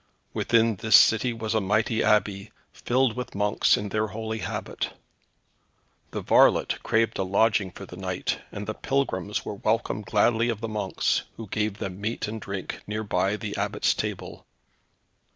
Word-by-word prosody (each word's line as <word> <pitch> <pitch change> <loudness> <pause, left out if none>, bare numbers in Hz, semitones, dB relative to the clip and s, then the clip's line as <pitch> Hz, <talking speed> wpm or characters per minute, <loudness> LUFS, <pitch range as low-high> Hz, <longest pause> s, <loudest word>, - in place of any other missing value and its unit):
Within 115 -2 +2
this 110 +1 +4
city 110 +4 +6
was 115 -1 -3
a 110 - +2
mighty 110 +3 +1
Abbey, 105 -1 +1 0.2
filled 125 -1 +1
with 125 -3 -6
monks 105 +1 +3
in 105 - -4
their 110 +2 0
holy 110 +1 -4
habit. - - -4 1.2
The - - -4
varlet - - +4
craved 115 0 +1
a - - +2
lodging 100 +1 +2
for 100 - -10
the 90 - -11
night, 90 -1 -2
and 105 0 -6
the 110 - -3
pilgrims 105 -7 -1
were - - -4
welcomed 105 0 -1
gladly 115 +2 +3
of 115 -3 -2
the 115 - -3
monks, 105 -3 -1
who 115 - -6
gave 105 0 -2
them 95 -1 -6
meat 110 +1 -2
and 110 +1 -5
drink 100 -2 -5
near 105 +1 -3
by 100 0 0
the 105 -1 -5
Abbot's - - +1
table. - - -5
110 Hz, 165 wpm, -26 LUFS, 100-115 Hz, 1.2 s, city